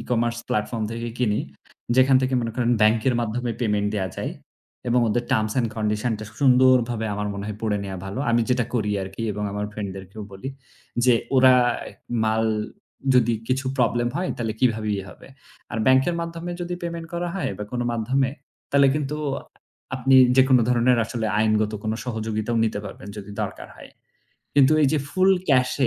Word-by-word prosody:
e-commerce 120 -1 -1
platform 105 +2 -1
থেকে 115 +1 -4
কিনি 105 -4 +1 0.6
যেখান 130 +1 +6
থেকে 130 0 0
মনে 115 -1 -2
করেন 120 -1 +1
bank 110 +1 +4
এর 125 - +2
মাধ্যমে 120 +1 -2
payment 105 -3 +1
দেয়া 95 -3 -1
যায় - - -3 0.6
এবং 125 +1 +3
ওদের 120 +3 0
terms 110 -1 +1
and 120 -2 +1
condition-টা 110 0 -1 0.2
সুন্দরভাবে 125 -4 +4
আমার 105 0 -2
মনে 100 0 -5
হয় 105 -1 -5
পড়ে 105 -2 0
নেয়া 95 -1 -5
ভালো। 95 +4 -5
আমি 120 0 +3
যেটা 125 -1 +2
করি 105 -3 0
আরকি 95 +4 -6
এবং 105 +1 -5
আমার 105 +1 -2
friend 105 -1 -4
দেরকেও 95 +3 -9
বলি। 95 +7 -6 0.6
যে 125 -1 +6 0.2
ওরা 130 0 +7 0.7
মাল 110 +1 +1 0.7
যদি 120 -2 +4 0.2
কিছু 130 +1 0
problem 120 0 +2
হয় 180 +1 -1
তালে 115 -2 -1
কিভাবে 110 -4 +1
ই - - -3
হবে। - - -14 0.5
আর 110 - -2
bank-এর 130 +6 +4
মাধ্যমে 170 +1 -5
যদি 175 0 -3
payment 170 -1 -4
করা 175 0 -2
হয় 195 - -2
বা 105 - -4
কোনো 120 -1 -1
মাধ্যমে 130 +4 0 0.4
তালে 140 0 +6
কিন্তু 150 0 -2 0.8
আপনি 135 +1 +2 0.2
যেকোনো 130 -1 +6
ধরনের 125 0 +3
আসলে 115 0 -3
আইনগত 110 0 +2
কোনো 110 +1 -1
সহযোগিতাও 110 -1 -2
নিতে 110 -2 -1
পারবেন, 100 0 -9
যদি 105 0 -8
দরকার - - -6
হয়। - - -13 0.6
কিন্তু 140 +1 +6
এই - - +5
যে 155 - +2
full 190 +1 +4 0.2
cash 130 -2 +3
120 Hz, 175 wpm, -23 LUFS, 110-130 Hz, 0.8 s, ওরা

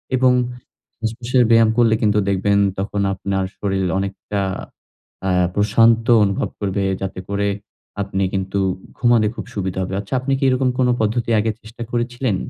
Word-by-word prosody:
এবং 130 0 +4
য - - -4 0.5
শ্বাসপ্রশ্বাসের 120 +2 +1
ব্যায়াম 115 -1 +6
করলে 115 -2 +4
কিন্তু 105 -1 +3
দেখবেন 100 +1 +2 0.2
তখন 100 +1 -2
আপনার 95 0 -2
শরীল 95 -2 -1
অনেকটা 100 +1 -3 0.9
আ - - +1 0.3
প্রশান্ত 115 +2 +4 0.2
অনুভব 100 -1 0
করবে 100 -1 -1 0.2
যাতে 95 -1 -4
করে 100 0 0 0.5
আপনি 100 -1 -2
কিন্তু 95 0 -1 0.4
ঘুমাতে 120 -3 +3
খুব - - -6
সুবিধা 95 -2 -2
হবে। 95 - -5
আচ্ছা 100 +5 -7
আপনি 135 +1 -1
কী - - -3
এরকম 130 0 +2
কোন 125 - +3
পদ্ধতি 115 +2 0
আগে 110 +1 +1
চেষ্টা 110 +2 -9
করেছিলেন? 120 -1 -1
105 Hz, 155 wpm, -20 LUFS, 100-120 Hz, 0.9 s, ব্যায়াম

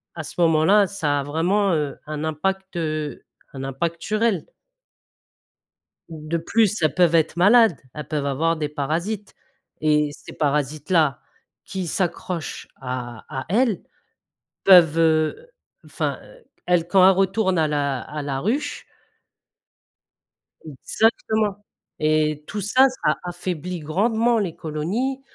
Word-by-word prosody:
à 155 - -5
ce 165 - -9
moment-là, 170 +5 +4
ça 145 -7 -1
a - - -5
vraiment, 180 +6 +1
heu, 150 -3 -1
un 155 0 -4
impact, 190 +5 -2
heu, 155 -2 -3 0.3
un 135 0 -6
impact 165 +5 -3
sur 215 +1 -2
elles 200 -9 +1 1.6
de 160 +1 -4
plus, 210 +3 +1
elles 155 -3 +2
peuvent 175 -2 +3
être 160 +1 +1
malades, 210 - +5
elles 150 - -7
peuvent 150 -2 -2
avoir 160 +4 0
des 150 -1 -2
parasites, 170 +8 -3 0.5
et 150 -1 +2
ces - - -12
parasites 150 +1 -1
là 160 -6 +3 0.5
qui 185 -2 -4
s'accrochent 175 -1 -3
à 125 -3 -5
à 130 -3 -5
elles 225 0 +2 0.8
peuvent, 170 -4 +7
heu, 160 - +1 0.4
enfin, - - -3 0.5
elles 175 -2 +2
quand 185 0 +5
elles 190 - +5
retournent 190 -1 +1
à 155 - +2
la 140 -4 -1
à 150 +4 -6
la 140 -2 -3
ruche 235 - -2 1.8
Exactement, 210 - 0 0.3
et 155 -1 +1
tout 210 - -4
ça, 255 +7 +4
ça 255 - -1
affaiblit 175 -1 -4
grandement 220 +9 +1
les 185 -6 -3
colonies, 200 - -3
165 Hz, 130 wpm, -22 LUFS, 150-195 Hz, 1.8 s, peuvent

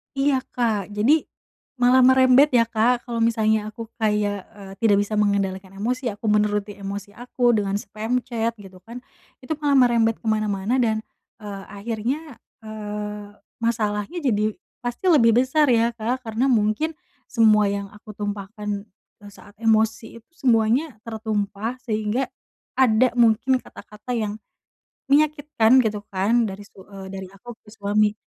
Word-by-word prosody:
Iya, 275 -1 +2 0.2
Kak. 215 -5 -1
Jadi, 265 +10 +3 0.5
malah 250 +1 +5
merembet 260 +2 +6
ya 230 - +6
Kak, 235 +2 +1
kalo 235 -2 -3
misalnya 220 -2 +2
aku 230 +1 -8
kayak, 210 -2 0 0.2
eee, 195 -1 -10
tidak 205 -3 +4
bisa 215 - -7
mengendalikan 195 -2 0
emosi 245 +4 -2
aku, 205 - -11
menuruti 210 -1 +1
emosi 200 +1 -7
aku 245 0 0
dengan 200 -2 0
spam 215 +5 -3
chat 230 -1 -2
gitu 190 -2 -14
kan, 235 +6 -10 0.5
itu 315 - -2
malah 285 -2 +3
merembet 230 -3 +3
ke - - -23
mana-mana 215 +2 0
dan, 220 -1 0 0.4
eee, 200 -2 -7
akhirnya, 230 +8 -4 0.3
eee, 210 -1 -6 0.3
masalahnya 220 - -1
jadi 215 -5 0 0.3
pasti 245 +9 -5
lebih 230 -6 +5
besar 280 +4 +3
ya, 235 0 +3
Kak, 240 +2 -3
karena 225 +4 0
mungkin 225 +8 +1 0.4
semua 215 -3 +4
yang 200 0 -3
aku 210 +1 -16
tumpahkan, 205 0 -5 0.3
eee, 205 - -11
saat 205 0 -16
emosi 225 +1 +1
itu, - - -55
semuanya 245 0 +1
tertumpah 220 +1 -3
sehingga 220 +3 -1 0.5
ada 250 -1 +4
mungkin 240 +3 +4
kata-kata 215 +4 -9
yang, 210 -1 -3 0.7
menyakitkan 290 -5 +4
gitu 210 -2 -3
kan 225 +5 +2
dari 195 0 -6
su 195 -2 -15
eee, 195 -1 -10
dari 190 0 -6
aku 235 +3 -11
ke 210 - -15
suami. 210 0 +1
220 Hz, 145 wpm, -23 LUFS, 205-245 Hz, 0.7 s, merembet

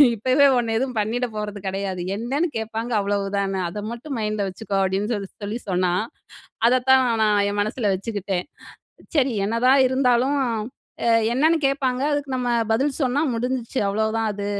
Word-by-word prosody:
இப்பவே 255 +6 +4
உன்ன 230 -2 0
எதுவும் 255 -2 -2
பண்ணிட 235 +4 -1
போறது 210 -1 -4
கிடையாது. 190 -1 -3 0.2
என்னன்னு 275 +10 -1
கேட்பாங்க 225 +2 -4
அவ்வளவு 200 0 -1
தான. 195 -1 -1
அத 205 +4 -6
மட்டும் 245 +3 -6
மைண்ட்ல 210 -2 -1
வச்சுக்கோ." 195 +1 -4
அப்டின்னு 195 +4 0
சொல்லி 200 -2 -5
சொல்லி 210 +4 -3
சொன்னா. 180 -1 +1 0.7
அதத்தான் 255 +2 +5 0.2
நான் 210 -1 +3
என் 205 0 -2
மனசுல 215 +1 -1
வச்சுக்கிட்டேன். 195 -2 -3 0.7
சரி 275 -4 +3
என்னதான் 250 +5 +3
இருந்தாலும் 260 +1 +2
அ 230 0 -6 0.3
என்னன்னு 315 +6 +3
கேட்பாங்க, 270 -2 +1
அதுக்கு 290 -1 -2
நம்ம 250 -1 -1 0.2
பதில் 265 +6 +2
சொன்னா 260 +2 +1
முடிஞ்சுச்சு. 250 +1 -2
அவ்ளோதான் 220 +2 0
அது. 200 0 -5
225 Hz, 150 wpm, -23 LUFS, 205-255 Hz, 0.7 s, அதத்தான்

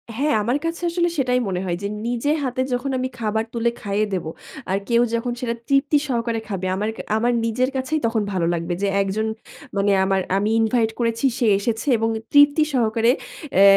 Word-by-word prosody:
হ্যাঁ। 290 +5 +1
আমার 245 +5 +1
কাছে 330 +1 -3
আসলে 345 0 +1
সেটাই 250 -2 +2
মনে 185 -2 -2
হয় 175 -2 -1
যে 200 - 0 0.2
নিজের 245 +5 0
হাতে 255 0 -1
যখন 250 +3 -1
আমি 255 0 -1
খাবার 220 0 0
তুলে 235 0 +1
খাইয়ে 205 +1 0
দেবো, 175 -4 -2 0.4
আর 190 - +2
কেউ 235 0 +4
যখন 235 +1 -1
সেটা 235 -2 -1
তৃপ্তি 280 +2 +3
সহকারে 235 -3 -1
খাবে 190 -2 -3
আমার 210 +3 -1
ক - - -18 0.2
আমার 240 +2 +2
নিজের 250 +3 +1
কাছেই 265 +4 -1
তখন 225 -1 +1
ভালো 180 -3 0
লাগবে। 170 +1 -2
যে 200 - +1
একজন 200 +3 -1 0.5
মানে 200 +1 +2
আমার 190 0 +1 0.2
আমি 205 +2 +1
ইনভাইট 225 0 +2
করেছি, 230 +1 0
সে 245 - +1
এসেছে 225 +5 -2
এবং 225 0 0 0.2
তৃপ্তি 290 +1 +6
সহকারে 230 -1 +3 0.5
এ - - +7
230 Hz, 190 wpm, -22 LUFS, 210-255 Hz, 0.5 s, এ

